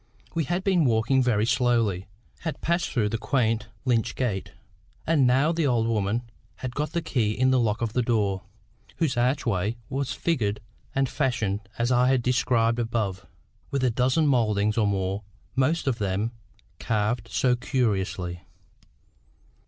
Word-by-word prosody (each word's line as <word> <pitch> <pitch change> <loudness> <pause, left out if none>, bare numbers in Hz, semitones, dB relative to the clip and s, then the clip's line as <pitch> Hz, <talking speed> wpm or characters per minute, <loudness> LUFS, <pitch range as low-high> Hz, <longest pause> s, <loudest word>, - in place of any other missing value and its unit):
We 165 -2 0
had 175 +6 -1
been 185 -4 +3
walking 120 +3 +3
very 110 -4 +2
slowly, 115 -7 +1 0.3
had 160 -2 -4
passed 170 0 0
through 110 -5 0
the 115 +1 -2
quaint 115 -4 0 0.2
lych 120 -2 +1
gate, 110 -7 -2 0.5
and 150 -5 +3
now 135 +6 +3
the 165 -3 +1
old 120 -3 +2
woman 110 +1 0 0.3
had 130 -2 -5
got 150 +3 -2
the 170 -1 -1
key 115 -9 0
in 130 +3 +2
the 130 - +4
lock 115 -1 0
of 110 -2 -2
the 125 - +2
door, 105 -5 +1 0.5
whose 155 -6 0
archway 120 -4 0
was 135 -1 -2
figured 115 -9 0 0.4
and 135 0 +2
fashioned 110 -8 -1
as 120 +1 +1
I 125 0 +4
have 130 -2 +2
described 120 -2 +2
above, 105 -5 -2 0.4
with 140 -1 -1
a 125 - +3
dozen 130 +7 +2
mouldings 105 -6 +2
or 110 -3 +2
more, 95 0 -1 0.3
most 140 +6 +1
of 130 -4 0
them 100 +3 -1 0.5
"carved 110 +1 -1
so 125 +1 +2
curiously." 95 -8 -1
120 Hz, 155 wpm, -26 LUFS, 105-130 Hz, 0.5 s, the